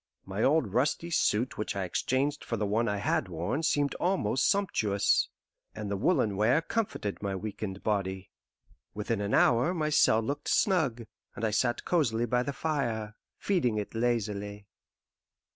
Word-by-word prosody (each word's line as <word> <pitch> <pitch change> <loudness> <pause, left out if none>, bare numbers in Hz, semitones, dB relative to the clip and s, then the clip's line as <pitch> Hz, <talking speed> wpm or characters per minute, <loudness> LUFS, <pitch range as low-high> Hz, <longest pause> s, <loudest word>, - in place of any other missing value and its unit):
My 95 +2 -4
old 135 -8 +2
rusty 150 +7 0
suit 120 -7 +1
which 105 - -2
I 100 - -1
exchanged 135 +10 -1
for 115 - -3
the 105 - -1
one 110 +3 +1
I 105 - 0
had 100 - 0
worn 85 - -2
seemed 145 -3 +1
almost 135 - +1
sumptuous, 110 - +2 0.5
and 105 -2 -5
the - - 0
woollen 110 - +1
wear 115 +9 +3
comforted 200 - -3
my 100 -1 -2
weakened 100 -1 -5
body. 95 -3 -2 0.6
Within 105 +1 -2
an 100 0 0
hour 125 +10 +3
my 155 -2 0
cell 115 -6 +4
looked 140 +5 -4
snug, 155 - +2 0.3
and 115 - -2
I 110 - +1
sat 120 +3 0
cosily 120 -10 +1
by 125 +1 +1
the 140 - -2
fire, 120 -9 -2 0.2
feeding 140 - +1
it 105 - -4
lazily. 105 -3 -2
115 Hz, 160 wpm, -29 LUFS, 105-140 Hz, 0.6 s, cell